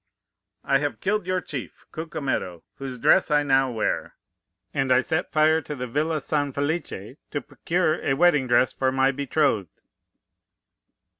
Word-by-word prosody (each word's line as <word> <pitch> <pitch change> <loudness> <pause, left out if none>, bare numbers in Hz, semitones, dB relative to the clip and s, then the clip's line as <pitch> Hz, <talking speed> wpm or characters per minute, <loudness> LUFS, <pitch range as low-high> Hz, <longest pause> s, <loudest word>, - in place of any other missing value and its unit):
"'I 135 - +2
have 145 0 -3
killed 205 -1 -1
your 185 0 0
chief, - - -7
Cucumetto, 140 - -3
whose 135 -2 -6
dress 180 +10 +4
I 150 -1 +3
now 135 -2 +3
wear; 115 - -2 0.6
and 135 -2 0
I 125 - +6
set 160 +6 -1
fire 155 +1 +4
to 150 +1 -6
the 125 -2 -4
villa 150 +6 -1
San 145 -1 -1
Felice 140 - -3
to 145 - -2
procure 170 -2 0
a 135 - +1
wedding 150 -4 +4
dress 120 +1 +3
for 130 -1 0
my 135 +1 +3
betrothed. 140 - -1
140 Hz, 150 wpm, -25 LUFS, 130-155 Hz, 0.6 s, I